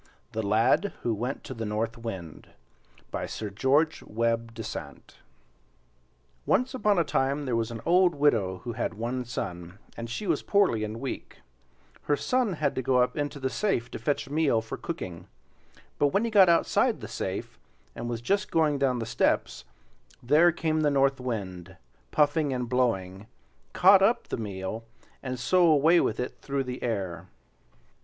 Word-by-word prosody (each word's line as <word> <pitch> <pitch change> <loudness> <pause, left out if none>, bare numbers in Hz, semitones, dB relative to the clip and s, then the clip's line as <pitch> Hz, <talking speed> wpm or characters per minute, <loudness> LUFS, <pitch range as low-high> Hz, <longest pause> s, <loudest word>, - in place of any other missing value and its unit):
THE 110 - -2
LAD 110 - +2
WHO 120 - +1
WENT 120 +6 -4
TO - - -7
THE 115 -2 -5
NORTH 110 +2 -2
WIND 95 -9 -7 0.6
By - - -3
Sir 105 -2 -5
George 140 +9 +2
Webbe 115 +1 -1
Dasent 115 -2 -8 1.3
Once 250 +5 +2
upon 210 -5 +2
a 170 - +4
time 140 0 0
there 125 -3 -1
was 115 -1 0
an 115 -2 -7
old 180 -1 +4
widow 110 -11 +1
who 120 -1 -4
had 115 -1 -3
one 120 +3 -3
son, 90 -6 -6 0.2
and 115 0 -6
she 165 - -4
was - - +1
poorly 195 - +2
and 110 +1 -4
weak, 135 +1 -6 0.6
her 145 - +2
son 250 - 0
had 160 - 0
to - - -2
go 130 0 +2
up 125 0 +2
into 145 -1 -3
the 130 - -1
safe 160 - -1
to - - -6
fetch 140 +4 -1
meal 145 -5 +2
for 115 0 -6
cooking; 90 - -6 0.7
but 145 - +4
when 195 +10 +1
he 230 - -2
got 195 -4 +7
outside 170 - +2
the - - -7
safe, - - -5 0.4
and 115 +1 -5
was 115 -1 -3
just 200 +11 0
going 155 -3 +2
down 130 -2 +2
the 115 - -3
steps, 110 - 0 0.6
there 155 +7 +5
came 160 -2 -1
the 150 - +3
North 135 -1 +2
Wind, 100 -8 -5 0.3
puffing 150 0 +2
and 125 -2 -2
blowing, 110 -6 -1 0.5
caught 190 +1 +7
up 215 +5 +2
the - - -2
meal, 105 0 -5 0.4
and 130 -2 -4
so 180 +7 +4
away 160 +3 +5
with 110 - 0
it 125 - -4
through 140 -1 -2
the 125 0 -6
air. 95 -7 -3
125 Hz, 170 wpm, -27 LUFS, 115-155 Hz, 1.3 s, got